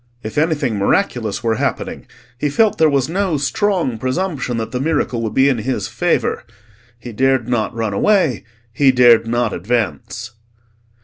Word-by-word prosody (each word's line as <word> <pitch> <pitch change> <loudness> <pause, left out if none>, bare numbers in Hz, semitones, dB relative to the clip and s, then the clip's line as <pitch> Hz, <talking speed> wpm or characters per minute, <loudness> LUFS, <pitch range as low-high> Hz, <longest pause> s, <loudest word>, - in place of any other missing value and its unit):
If 110 - -6
anything 145 -8 0
miraculous 110 - 0
were 115 -1 0
happening, - - -3 0.3
he 145 +4 -1
felt 215 +7 +2
there 160 -1 +5
was 140 -3 +1
no 180 -1 -1
strong 165 - 0
presumption 130 -2 -2
that 115 -1 -4
the 125 - -2
miracle 140 -5 -1
would 110 -2 -4
be 135 +1 +4
in 130 -4 +1
his 130 +4 -2
favour. - - -1 0.5
He 120 0 -9
dared 130 +1 +1
not 120 -1 -1
run 110 -3 -2
away; 160 - +2 0.3
he 135 +1 +4
dared 120 -3 +5
not 120 -1 0
advance. 110 - -3
125 Hz, 160 wpm, -18 LUFS, 115-150 Hz, 0.5 s, there